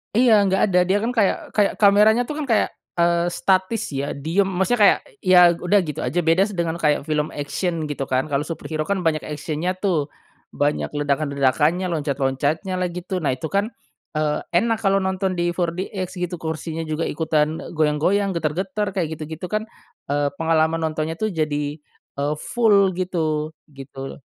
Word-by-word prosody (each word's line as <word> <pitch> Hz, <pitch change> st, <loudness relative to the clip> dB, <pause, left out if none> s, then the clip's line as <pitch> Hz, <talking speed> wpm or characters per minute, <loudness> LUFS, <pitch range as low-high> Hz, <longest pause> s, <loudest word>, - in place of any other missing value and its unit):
Iya 240 Hz, -1 st, +5 dB
nggak 190 Hz, 0 st, +1 dB
ada, 180 Hz, -, +4 dB
dia 195 Hz, -, +3 dB
kan 235 Hz, -, 0 dB
kayak 220 Hz, -6 st, +2 dB
kayak 205 Hz, -2 st, +2 dB
kameranya 210 Hz, +4 st, +5 dB
tuh 295 Hz, +5 st, -6 dB
kan 300 Hz, -, -2 dB
kayak, 225 Hz, -4 st, +2 dB, 0.3 s
eee, 170 Hz, 0 st, +2 dB
statis 190 Hz, +4 st, 0 dB
ya 140 Hz, +1 st, -3 dB
diam 165 Hz, +8 st, 0 dB
maksudnya 190 Hz, +6 st, 0 dB
kayak -, -, +5 dB, 0.2 s
ya 180 Hz, -1 st, +6 dB
udah 180 Hz, +4 st, +2 dB
gitu 150 Hz, -4 st, -5 dB
aja. 130 Hz, +8 st, -1 dB
Beda 165 Hz, +5 st, +3 dB
dengan 170 Hz, -4 st, -2 dB
kayak 150 Hz, -3 st, +2 dB
film 150 Hz, -1 st, 0 dB
action 160 Hz, +3 st, -2 dB
gitu 135 Hz, -2 st, -4 dB
kan 130 Hz, 0 st, +1 dB
kalau 140 Hz, +1 st, +1 dB
superhero 155 Hz, -2 st, -4 dB
kan 195 Hz, -2 st, -1 dB
banyak 160 Hz, -2 st, +2 dB
action-nya 155 Hz, +4 st, -3 dB
tuh, 180 Hz, -7 st, 0 dB, 0.5 s
banyak 145 Hz, +1 st, 0 dB
ledakan-ledakannya, 145 Hz, +4 st, +1 dB
loncat-loncatnyalah 150 Hz, +5 st, -1 dB
gitu. 180 Hz, +1 st, -3 dB
Nah 145 Hz, -6 st, 0 dB
itu 130 Hz, +5 st, -5 dB
kan, 200 Hz, +2 st, +1 dB, 0.5 s
eee, 150 Hz, -1 st, 0 dB, 0.2 s
enak 225 Hz, +4 st, +2 dB
kalau 195 Hz, -2 st, +2 dB
nonton 190 Hz, 0 st, -1 dB
di 175 Hz, 0 st, 0 dB
4DX 180 Hz, +2 st, -3 dB
gitu 180 Hz, 0 st, -3 dB
kursinya 160 Hz, 0 st, -4 dB
juga 155 Hz, +1 st, -2 dB
ikutan 155 Hz, 0 st, 0 dB
e -, -, -8 dB
goyang-goyang, 160 Hz, +6 st, +2 dB
getar-getar 185 Hz, +5 st, -2 dB
kayak 160 Hz, -4 st, -2 dB
gitu-gitu 160 Hz, +2 st, -6 dB
kan, 215 Hz, +1 st, -1 dB, 0.4 s
eee, 145 Hz, 0 st, +1 dB
pengalaman 160 Hz, 0 st, +2 dB
nontonnya 155 Hz, +1 st, -3 dB
tuh 215 Hz, -, 0 dB
jadi, 150 Hz, -2 st, -1 dB, 0.4 s
eee, 145 Hz, +2 st, -1 dB
full 200 Hz, -5 st, +3 dB
gitu, 160 Hz, -4 st, -1 dB, 0.2 s
gitu. 135 Hz, 0 st, -8 dB
165 Hz, 165 wpm, -22 LUFS, 150-190 Hz, 0.5 s, ya